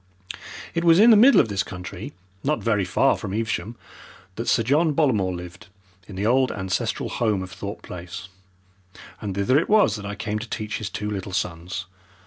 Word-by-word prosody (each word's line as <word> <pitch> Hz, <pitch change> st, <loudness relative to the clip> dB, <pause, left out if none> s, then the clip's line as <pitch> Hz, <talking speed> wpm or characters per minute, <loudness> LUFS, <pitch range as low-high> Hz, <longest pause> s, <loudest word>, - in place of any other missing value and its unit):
It 165 Hz, -, -1 dB
was 165 Hz, -1 st, +6 dB
in 225 Hz, +4 st, +8 dB
the -, -, +8 dB
middle 250 Hz, +7 st, +7 dB
of 125 Hz, -, +4 dB
this 100 Hz, -3 st, -1 dB
country, 90 Hz, -2 st, -7 dB, 0.3 s
not 150 Hz, +2 st, 0 dB
very 105 Hz, -4 st, +1 dB
far 90 Hz, -, +3 dB
from 95 Hz, -, -5 dB
Evesham, 110 Hz, -1 st, -2 dB, 0.6 s
that 115 Hz, -, -4 dB
Sir 115 Hz, -, +3 dB
John 150 Hz, +6 st, +2 dB
Bollamore 110 Hz, -, +2 dB
lived 90 Hz, 0 st, -9 dB, 0.4 s
in 100 Hz, -, -9 dB
the 100 Hz, +2 st, -2 dB
old 130 Hz, +2 st, +3 dB
ancestral 95 Hz, -2 st, -2 dB
home 105 Hz, -5 st, 0 dB
of 95 Hz, -, -9 dB
Thorpe 100 Hz, +1 st, -7 dB
Place, 90 Hz, +1 st, -8 dB, 0.9 s
and 100 Hz, -3 st, -4 dB
thither 115 Hz, +8 st, +3 dB
it 165 Hz, -, -3 dB
was 205 Hz, -, +4 dB
that 100 Hz, -, -8 dB
I 100 Hz, -, -4 dB
came 105 Hz, +1 st, -3 dB
to 115 Hz, +2 st, -8 dB
teach 110 Hz, -1 st, -4 dB
his 110 Hz, -, -4 dB
two 105 Hz, -1 st, -4 dB
little 95 Hz, -2 st, -5 dB
sons. 90 Hz, 0 st, -3 dB
105 Hz, 190 wpm, -24 LUFS, 95-125 Hz, 0.9 s, in